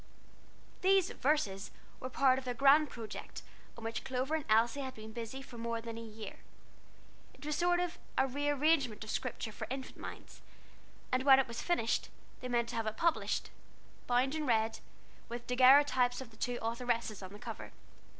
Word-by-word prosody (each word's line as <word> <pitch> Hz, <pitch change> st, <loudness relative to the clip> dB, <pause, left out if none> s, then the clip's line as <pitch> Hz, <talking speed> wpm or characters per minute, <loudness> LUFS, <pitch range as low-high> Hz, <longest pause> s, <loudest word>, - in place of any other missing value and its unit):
These 380 Hz, -1 st, +4 dB
"Verses" 210 Hz, -9 st, 0 dB, 0.3 s
were 255 Hz, -, -5 dB
part 260 Hz, 0 st, +4 dB
of 260 Hz, -, -11 dB
a 245 Hz, -, -1 dB
grand 280 Hz, +4 st, +6 dB
project 225 Hz, -4 st, -7 dB, 0.3 s
on 230 Hz, -, -9 dB
which 225 Hz, 0 st, -3 dB
Clover 260 Hz, +3 st, -2 dB
and 315 Hz, -2 st, 0 dB
Elsie 230 Hz, +5 st, +3 dB
had 260 Hz, -1 st, -5 dB
been 220 Hz, 0 st, -9 dB
busy 235 Hz, +4 st, -6 dB
for 240 Hz, -3 st, -11 dB
more 230 Hz, 0 st, -2 dB
than 230 Hz, 0 st, -7 dB
a 230 Hz, -, -6 dB
year. 220 Hz, -2 st, -8 dB, 1.0 s
It -, -, -13 dB
was 300 Hz, -, -1 dB
a -, -, -3 dB
sort 350 Hz, 0 st, +3 dB
of 355 Hz, -1 st, -2 dB, 0.2 s
rearrangement 285 Hz, -2 st, +2 dB
of 215 Hz, -, -5 dB
Scripture 235 Hz, -3 st, -3 dB
for 220 Hz, +1 st, -6 dB
infant 265 Hz, +1 st, -6 dB
minds; -, -, -9 dB, 0.7 s
and 255 Hz, 0 st, +2 dB
when 265 Hz, 0 st, +8 dB
it 270 Hz, -, +2 dB
was 235 Hz, -1 st, -5 dB
finished, 290 Hz, -11 st, 0 dB, 0.3 s
they 250 Hz, -, -5 dB
meant 240 Hz, -1 st, 0 dB
to -, -, -5 dB
have 225 Hz, -1 st, -1 dB
it 215 Hz, -, -3 dB
published, 335 Hz, -1 st, 0 dB, 0.6 s
bound 250 Hz, +3 st, +2 dB
in 310 Hz, -2 st, -2 dB
red, 225 Hz, -1 st, +2 dB, 0.5 s
with 240 Hz, 0 st, -6 dB
daguerreotypes 255 Hz, 0 st, +5 dB
of 260 Hz, -3 st, -8 dB
the -, -, -17 dB
two 245 Hz, +1 st, -1 dB
authoresses 230 Hz, -2 st, -1 dB
on 185 Hz, -1 st, -8 dB
the 205 Hz, -, -9 dB
cover. -, -, -7 dB
250 Hz, 180 wpm, -33 LUFS, 230-275 Hz, 1.0 s, when